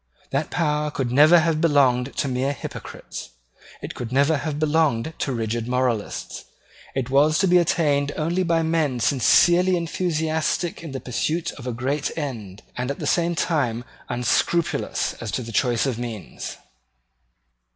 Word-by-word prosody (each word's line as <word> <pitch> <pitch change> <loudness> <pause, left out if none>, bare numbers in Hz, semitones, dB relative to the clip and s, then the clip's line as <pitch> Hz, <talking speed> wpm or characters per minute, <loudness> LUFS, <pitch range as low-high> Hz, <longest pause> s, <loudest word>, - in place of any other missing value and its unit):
That - - -1
power 150 -2 0
could 135 -4 -3
never 150 +6 +7
have 160 -1 0
belonged 135 -5 +3
to - - 0
mere 130 +2 0
hypocrites. - - -8 0.5
It - - -5
could 120 -1 -6
never 140 +4 +3
have 145 +1 -3
belonged 155 -3 +1
to 135 - -1
rigid 115 -1 -2
moralists. 125 -4 -2 0.5
It 130 -1 -2
was 150 +3 +4
to 190 +1 +3
be 180 0 +5
attained 145 -4 +1
only 170 +4 0
by 165 -2 +1
men 160 -6 0
sincerely 175 +8 +4
enthusiastic 160 -1 -1
in 165 -3 -7
the 135 - -4
pursuit 155 +7 -2
of 130 -3 -10
a - - -1
great 135 +5 -2
end, 110 - -5
and 125 +1 -3
at 140 - -3
the - - -5
same 170 0 +1
time 130 -9 0 0.3
unscrupulous 125 +7 0
as - - -4
to 125 - -1
the 115 - -8
choice 120 0 +1
of 125 -4 -2
means. 115 -5 -6
145 Hz, 155 wpm, -23 LUFS, 125-160 Hz, 0.5 s, never